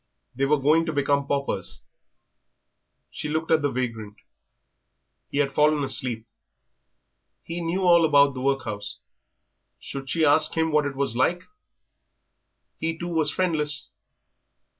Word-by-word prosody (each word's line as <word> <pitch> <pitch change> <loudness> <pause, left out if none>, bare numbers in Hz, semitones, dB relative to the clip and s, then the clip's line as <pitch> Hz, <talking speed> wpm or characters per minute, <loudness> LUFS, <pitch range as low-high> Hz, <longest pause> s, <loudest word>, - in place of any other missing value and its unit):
They 135 +2 0
were 150 +1 +3
going 155 +4 +2
to 160 - -2
become 140 -1 0
paupers. 140 -1 -3 1.3
She 150 - -5
looked 160 +2 -2
at 160 -1 +4
the 145 - +1
vagrant 115 -5 -4 1.1
he - - -5
had 140 -1 +1
fallen 150 -1 +2
asleep. 120 -4 0 1.2
He 170 +1 -5
knew 170 +3 -2
all 170 -2 +5
about 145 -3 +4
the 130 - -6
workhouse 110 -7 -3 0.8
should 135 -1 -8
she 160 +2 +1
ask 155 +2 +3
him 160 0 +1
what 150 -1 +2
it 140 - -6
was 135 -4 -1
like? 170 +8 +1 1.4
He, 165 0 -2
too, 175 +1 -5
was 160 -3 +4
friendless. 150 -7 -1
145 Hz, 135 wpm, -24 LUFS, 135-160 Hz, 1.4 s, all